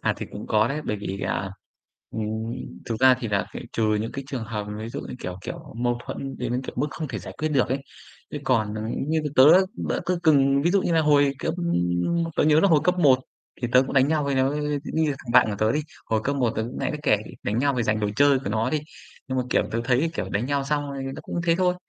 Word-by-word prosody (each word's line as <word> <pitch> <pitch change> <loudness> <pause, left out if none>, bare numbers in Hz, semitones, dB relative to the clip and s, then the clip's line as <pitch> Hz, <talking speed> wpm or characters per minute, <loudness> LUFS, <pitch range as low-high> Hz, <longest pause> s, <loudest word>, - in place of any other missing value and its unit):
À, - - +1
thì - - -6
cũng - - -7
có 110 +1 +3
đấy, 150 +2 -2
bởi 105 - -1
vì, 100 -1 -5
à, 95 - -2 0.6
ừm, 110 +1 -3 0.3
thực 115 -1 -3
ra 130 0 +7
thì 115 - -3
là 100 -1 0
phải - - -6
trừ 110 -1 +1
những 115 - -4
cái 135 - -5
trường 130 -5 -4
hợp 105 -2 -4
ví 110 +1 -5
dụ - - -5
như, - - -7
kiểu 90 -4 -6
kiểu, 165 -4 -8
mâu 120 0 0
thuẫn 135 0 -6
đến, 125 +2 -2
kiểu, - - -7
mức - - +1
không 155 -1 -5
thể - - -4
giải - - -9
quyết 155 - 0
được 140 -5 +2
ấy. 130 - 0 0.5
Thế 150 - -3
còn 110 -5 +1
là 110 - -4 0.3
như 160 0 +2 0.2
tớ, 130 - +8 0.4
đỡ - - 0
tớ 180 - +2
từng 140 -3 +4
ví 170 - +2
dụ 195 0 +3
như 175 - 0
là 165 - +4
hồi 145 -2 +4
cấp - - -2 0.8
tớ - - +3
nhớ 155 0 +5
là 200 - +4
hồi 160 -4 +5
cấp 180 +1 +2
1 140 -6 +5 0.4
thì 120 - 0
tớ 125 - +7
cũng 135 - -6
đánh 135 +1 +4
nhau 155 -2 +1
với 140 -1 0
nó, 130 0 +2 0.4
nghi 160 0 +2
là 145 - 0
thằng 120 -3 -7
bạn 125 - +7
của 100 - -3
tớ 110 +1 +2
đi, 150 - +1 0.3
hồi 110 -1 +2
cấp 140 +1 0
1 125 -4 +2
tớ 110 - 0
cũng 120 +3 -6
nãy - - -1
mới 150 -1 -5
kể, 125 -8 +4 0.3
đánh 105 +3 -1
nhau 140 +2 +2
vì 120 - 0
dành 110 -1 0
đồ 105 -1 0
chơi 145 0 +5
của 130 - -4
nó 110 +1 0
đi. 155 - 0 0.5
Nhưng 130 0 -1
mà, 125 - 0
kiểu, - - +3
tớ 115 - -1
thấy, 130 +6 +2
kiểu, - - -3
đánh 105 +5 -1
nhau 140 0 0
xong, 145 0 -1
ờ, 140 - -6 0.2
tớ - - -6
cũng 170 - -4
thế 165 - +4
thôi. 180 -1 +2
130 Hz, 275 wpm, -24 LUFS, 115-150 Hz, 0.8 s, tớ